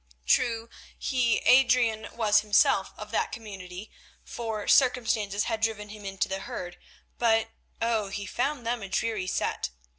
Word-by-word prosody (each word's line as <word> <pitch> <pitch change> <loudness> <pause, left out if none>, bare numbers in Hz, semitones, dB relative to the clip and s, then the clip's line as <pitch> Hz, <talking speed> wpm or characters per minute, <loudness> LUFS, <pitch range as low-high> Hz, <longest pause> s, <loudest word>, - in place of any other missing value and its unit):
True, 230 - +2 0.3
he, 245 -4 +1
Adrian, 245 -4 +4
was 215 -2 +3
himself 205 -2 +3
of 210 0 -8
that - - 0
community, 195 -3 -8 0.3
for 220 -3 -5
circumstances 225 -6 +3
had 225 -2 -2
driven 215 -2 -1
him 210 -1 -10
into 195 -2 -1
the 190 0 -3
herd, 175 -2 -7 0.4
but 225 -1 +3 0.3
oh! 225 -3 +1
he 200 +1 -5
found 260 +3 -2
them 235 0 -1
a 195 - -7
dreary 210 -1 -1
set. - - -1
220 Hz, 145 wpm, -27 LUFS, 200-235 Hz, 0.4 s, Adrian